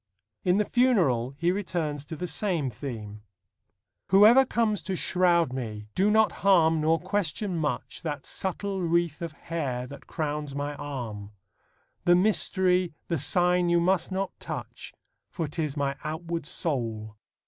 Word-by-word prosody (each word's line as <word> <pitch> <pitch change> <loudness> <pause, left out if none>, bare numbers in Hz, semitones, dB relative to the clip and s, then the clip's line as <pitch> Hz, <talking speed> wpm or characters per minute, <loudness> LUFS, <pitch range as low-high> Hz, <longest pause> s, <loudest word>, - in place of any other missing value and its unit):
In 180 +1 +3
The 210 - +2
Funeral 165 - +2
he 170 +3 +2
returns 170 -7 -2
to 160 - -6
the 180 - -4
same 165 -6 -1
theme: 110 -4 -7 0.9
Whoever 220 +8 +7
comes 220 -4 +1
to 190 - -3
shroud 175 -6 +2
me 110 -5 -5
do 195 +3 +2
not 220 0 +4
harm 165 -5 +4
Nor 160 +1 +3
question 190 0 -2
much 150 -6 -3
That 150 -4 -4
subtle 195 +1 -3
wreath 170 -2 0
of 165 -2 -4
hair 140 -8 -3
that 140 +2 -11
crowns 150 -3 -3
my 145 +1 -2
arm; 120 -8 -6 0.7
The 175 - +6
mystery, 185 -3 +2
the 165 -3 0
sign 180 +4 +3
you 170 0 +4
must 185 +2 +1
not 190 0 -2
touch, - - -7 0.4
For 165 -4 -3
'tis 150 -1 -3
my 140 -1 0
outward 165 0 -4
soul. 115 -10 -3
165 Hz, 145 wpm, -27 LUFS, 140-185 Hz, 0.9 s, Whoever